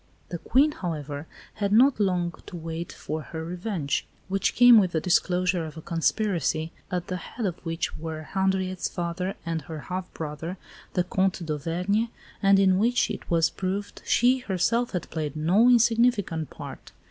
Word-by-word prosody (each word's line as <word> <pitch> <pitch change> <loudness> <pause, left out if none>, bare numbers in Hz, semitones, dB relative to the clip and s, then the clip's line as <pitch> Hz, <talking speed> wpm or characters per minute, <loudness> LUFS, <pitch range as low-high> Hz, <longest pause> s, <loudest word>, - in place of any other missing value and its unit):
The 175 - -4
Queen, 280 - +3
however, 155 - -5 0.3
had 200 -2 -2
not 245 +3 +5
long 180 -4 +1
to - - -8
wait 165 0 -5
for 155 +1 -5
her 160 +1 -6
revenge, 175 -4 -2 0.2
which 195 0 0
came 245 -2 +9
with 185 -4 +1
the 160 - +2
disclosure 180 0 +1
of 155 -1 -8
a - - -6
conspiracy, 165 -2 0 0.2
at 180 -1 -2
the 185 - -3
head 220 +6 -6
of 180 -3 -3
which 165 -1 -2
were 160 -1 -5
Henriette's 190 +1 -1
father 175 +2 -3
and 165 -1 -2
her 155 +1 -7
half 180 +4 -5
brother, 160 +4 -5 0.4
the 180 - +2
Comte 190 -1 0
d'Auvergne, 175 +9 -1 0.3
and 195 -1 +5
in 190 -1 +4
which, 240 +3 +2
it - - -7
was 165 -1 +3
proved, 195 +2 -4
she 250 +2 +3
herself 230 +3 0
had 180 - -2
played 155 -3 -3
no 180 +10 +4
insignificant 230 - +3
part. - - -10
180 Hz, 165 wpm, -26 LUFS, 165-200 Hz, 0.4 s, came